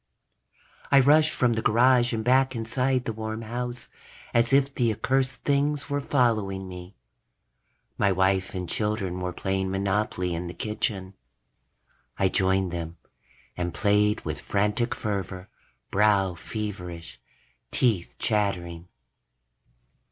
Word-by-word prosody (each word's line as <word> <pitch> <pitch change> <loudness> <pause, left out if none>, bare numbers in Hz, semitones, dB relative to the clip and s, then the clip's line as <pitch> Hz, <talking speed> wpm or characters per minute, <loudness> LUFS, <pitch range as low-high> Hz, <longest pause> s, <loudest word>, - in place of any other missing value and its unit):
_ - - -18
I 140 - +7
rushed 150 +3 +5
from 120 -2 +1
the 110 - -1
garage 120 +2 +4
and 110 -2 -2
back 130 +1 +3
inside 125 +3 0
the 115 - -2
warm 110 +1 -5
house, 120 +1 -4 0.5
as 120 0 +3
if 140 0 +3
the 120 -4 +1
accursed 130 +3 -1
things 145 0 0
were 145 0 0
following 110 -9 0
me. 90 +1 -10 1.0
My 100 - +3
wife 95 +1 +1
and 90 -1 -3
children 105 -4 -1
were 90 0 -2
playing 95 +1 -2
Monopoly 95 -2 -1
in 85 +1 -4
the 85 - -7
kitchen. 100 -3 -2 1.0
I 95 - +2
joined 95 -1 +1
them 85 -1 -5 0.6
and 90 -1 -3
played 105 +1 +2
with - - -3
frantic 105 +4 0
fervor, 95 -3 -4 0.4
brow 100 -2 +3
feverish, 90 -4 -6 0.5
teeth 105 - 0
chattering. 90 -6 -1
105 Hz, 125 wpm, -26 LUFS, 95-120 Hz, 1.0 s, I